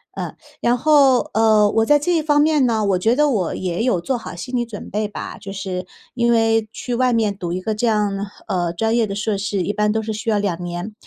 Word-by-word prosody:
呃， - - -5 0.3
然 240 +1 +2
后， 275 -3 +4
呃， 220 -1 +4
我 225 - +2
在 295 +5 +5
这 330 +2 +1
方 295 -1 +2
面 300 -3 +3
呢， 220 -3 +1
我 190 -2 +1
觉 225 +6 +2
得 295 +1 +3
我 195 -10 -1
也 180 +1 -3
有 240 -8 +1
做 255 +9 -2
好 225 -6 -7
心 250 +9 -6
理 240 - +1
准 225 -4 -8
备 210 +1 -1
吧， 205 - -7
就 195 - -7
是 185 -2 -5 0.3
因 235 -1 +1
为 225 -1 +2
去 245 - -5
外 250 +1 +2
面 215 -3 +1
读 175 -3 -5
一 180 - -2
个 215 +4 -2
这 225 +3 -1
样， 205 -2 0 0.2
呃， 175 -4 -1
专 225 +6 0
业 230 -2 +2
的 195 - -4
硕 210 +1 -1
士 195 -1 -2
一 205 - -2
般 210 0 +1
都 220 0 -1
是 220 - -3
需 215 +2 -4
要 210 - +2
2 180 -4 -2
年， 175 +4 -5
215 Hz, 260 characters per minute, -20 LUFS, 195-240 Hz, 0.3 s, 在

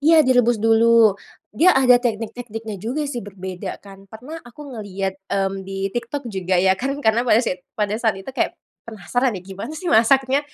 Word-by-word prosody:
Iya 315 0 +5
direbus 245 -2 +3
dulu, 225 0 +5 0.4
dia 330 +8 +4
ada 250 -2 +5
teknik-tekniknya 225 -2 -4
juga 260 +8 -2
sih 250 -4 -4
berbeda 190 -2 -7
kan. 195 0 -14
Pernah 270 +10 -9
aku 240 - -15
ngelihat, 195 -3 -4 0.2
mmm, 195 0 -1
di 195 0 -4
TikTok 265 +3 -4
juga 185 -1 0
ya 190 +1 +4
kan 270 +8 -3
karena 220 +2 +3
pada 240 -3 +3
saat 180 0 -3
itu - - -47
pada 210 -1 0
saat 220 -4 +1
itu 195 +7 -8
kayak - - 0 0.4
penasaran 230 +4 -1
ya 180 - -8
gimana 195 +9 -7
sih 355 0 -2
masaknya. 265 +4 +4
225 Hz, 180 wpm, -21 LUFS, 195-250 Hz, 0.4 s, Iya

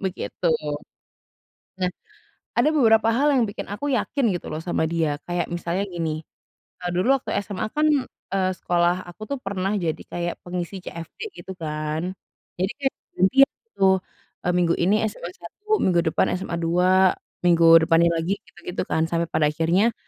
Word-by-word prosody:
begitu. 190 0 -5 1.3
Nah, 180 -1 +1 0.7
ada 300 - +4
beberapa 225 -6 +4
hal 285 +5 +3
yang 255 -4 +4
bikin 205 - -5
aku 285 +8 -3
yakin 275 +4 -1
gitu 170 - -7
loh 155 - -3
sama 170 -1 -1
dia. 160 -3 0
Kayak 175 0 -1
misalnya 175 +3 -2
gini, 165 -4 -3 0.6
eee, 180 - -1
dulu 210 +10 +3
waktu - - -5
SMA 200 0 -4
kan, 305 +1 +3 0.5
eee, 185 -1 +2
sekolah 175 +1 +1
aku 175 +5 -12
tuh 280 - -1
pernah 195 -4 -2
jadi 165 -3 -2
kayak 175 0 -2
pengisi 180 +1 -5
CFD 170 -2 -9 0.2
gitu 190 - -7
kan. 155 -1 -3 0.6
Jadi 185 +2 0
kayak 270 -1 0 0.2
gantian 265 +10 +5 0.2
gitu, 455 - -9 0.6
eee, 180 - +1
minggu 170 -1 +3
ini 185 +4 +2
SMA 180 -4 -6
1, 415 - -3
minggu 175 -2 +3
depan 160 - +2
SMA 180 -2 -3
2, 180 +3 +4 0.3
minggu 170 -1 +5 0.2
depannya 170 +1 +4
lagi 175 +5 0
gitu-gitu 175 +1 -6
kan. 160 0 +2
Sampai 165 0 -1
pada 150 - +2
akhirnya, 175 +9 +2
180 Hz, 160 wpm, -24 LUFS, 170-200 Hz, 1.3 s, gantian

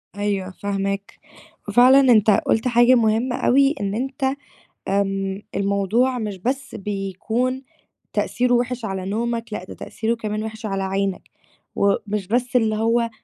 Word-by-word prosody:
أيوه 200 -2 -2
فاهماك، 200 +1 -4 0.5
وفعلًا 255 +3 +6
أنت 215 -2 +5
قُلت 220 +4 +1
حاجة 240 +1 +5
مهمّة 230 +2 +1
أوي 275 +3 +3
إن 200 0 -2
أنت 265 +3 -2 0.6
آمم، 195 0 -1
الموضوع 200 +6 +1
مش 210 -4 -4
بس 265 +6 -3
بيكون 210 +6 -2 0.5
تأثيرُه 245 0 +1
وِحِش 245 -1 -1
على 190 -3 -4
نومك 230 +2 -3
لأ، 180 - -4
ده 185 - -9
تأثيرُه 225 +1 -3
كمان 215 -1 -4
وِحِش 220 0 -7
على 195 -2 -2
عينك، 195 0 -1 0.5
ومش 200 0 0
بس 245 +4 -1
اللي 220 -3 +3
هو 230 +2 +1
220 Hz, 135 wpm, -22 LUFS, 200-245 Hz, 0.6 s, وفعلًا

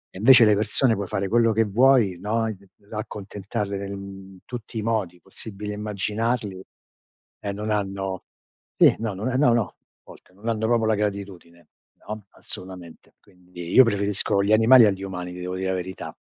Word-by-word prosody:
E - - -7
invece 125 0 +8
le 105 - +5
persone 110 +4 +2
puoi 100 -2 -3
fare 95 +1 -2
quello 115 +1 +3
che 115 - +3
vuoi, 110 -3 +3
no, 110 +4 -1
ehm 110 -1 -3 0.4
accontentarle, 100 -1 -5
mhmm, 100 -1 -9
in - - -17
tutti 120 -2 -8
i 110 - -2
modi 105 -6 -2
possibili 105 +4 -8
e - - -4
immaginabili 105 0 -2 0.8
e 100 - -4
non 105 +2 -4
hanno 95 -2 -2 0.5
sì, - - +6
no, 110 -3 -3
non 100 +5 -4
ehm, 130 - 0
no, 125 -5 +5
no, 120 -1 +3
a - - -28 0.3
volte 90 - -17
non 100 +4 -11
hanno 110 -1 0
proprio 115 -1 +2
la 110 - +2
gratitudine. 100 -5 -4 0.4
No, 105 -1 -7
assolutamente. 90 -3 -9
Quindi 90 -2 -11
io 130 - +9
preferisco 100 -2 +1
gli 105 +2 +2
animali 115 +2 +7
agli 95 -2 0
umani, 90 -2 -5
ti 90 - -9
devo 90 +1 -4
dire 95 0 -2
la - - 0
verità. 95 0 -6
105 Hz, 185 wpm, -24 LUFS, 95-110 Hz, 0.8 s, io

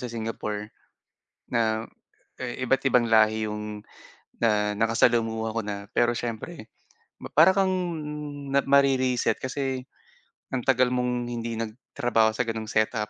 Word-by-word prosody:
sa - - -10
Singapore 105 -1 -4 0.8
na 110 -1 +1 0.5
iba't 130 +1 -1
ibang 125 -3 +3
lahi 110 -1 +4
'yong 105 0 -5 0.6
na 105 -2 +1
nakasalamuha 115 -1 +2
ko 115 +1 -2
na. 100 -1 -5
Pero 120 0 +2
siyempre 115 -2 -6 0.5
ma - - -7
para 170 +5 +6
kang 190 -1 +2 0.9
mare-reset 135 -3 +3
kasi 130 -1 -3 0.7
ang 125 - 0
tagal 130 -1 +3
mong 125 -1 0
hindi 115 -1 -4
nagtrabaho 115 0 0
sa 110 +3 -1
ganong 110 -1 -4
setup. 110 -1 0
115 Hz, 120 wpm, -26 LUFS, 110-125 Hz, 0.9 s, para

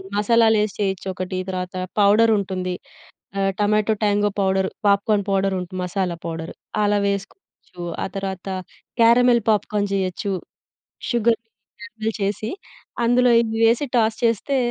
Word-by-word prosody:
మసాలాలేసి 220 -1 +3
చేయొచ్చొకటి, 185 -1 -2
తర్వాత 185 0 -4 0.2
పౌడరుంటుంది, 200 -3 +3 0.7
ఆహ్, 195 0 +2
tomato 210 +1 +2
tango 205 0 +2
powder, 190 0 +1 0.2
popcorn 200 0 +2
పౌడరుంటు 190 -2 0
masala 180 -1 -2
powder. 165 0 -5 0.3
అలా 205 0 +2
వేసుకోవచ్చు. 195 - -6 0.2
ఆ - - -1
తర్వాత 195 -1 -4 0.5
క్యారమిల్ 235 +1 +5
పాప్‌కార్న్ 205 -1 +1
జేయొచ్చు. 195 +1 -1 0.8
షుగర్‌ని 230 -1 +1 0.3
క్యారమిల్ 225 -1 -4
చేసి, 205 +3 -2 0.5
అందులో 245 +1 +4
ఇవి 225 -1 -2
వేసి, 240 +5 +2
టాస్ 220 -1 +2
చేస్తే 230 +5 +1
205 Hz, 110 wpm, -22 LUFS, 190-225 Hz, 0.8 s, క్యారమిల్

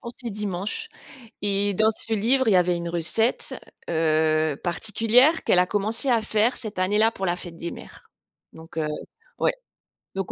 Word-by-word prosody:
pour 235 - -8
ces 235 -3 -6
dimanches. 210 - -5 0.5
Et 200 0 +1
dans 220 +3 +3
ce 225 +1 +1
livre, 245 +4 +2
il - - +4
y - - +5
avait 180 -1 +2
une 170 0 -5
recette, 175 +8 0 0.4
heu, 155 -2 +1
particulière 225 - +3
qu'elle 180 - +4
a 180 - +3
commencé 215 +7 -2
à 235 -3 +2
faire 220 +2 +2
cette 215 -5 -8
année-là 210 +4 +3
pour 195 -4 -5
la 175 - -1
fête 175 -2 -9
des 170 +1 -6
mères. - - -13 0.4
Donc, 160 0 -11
heu, 155 - -1 0.5
ouais, - - +2 0.6
donc 195 -1 -4
205 Hz, 175 wpm, -23 LUFS, 175-225 Hz, 0.6 s, y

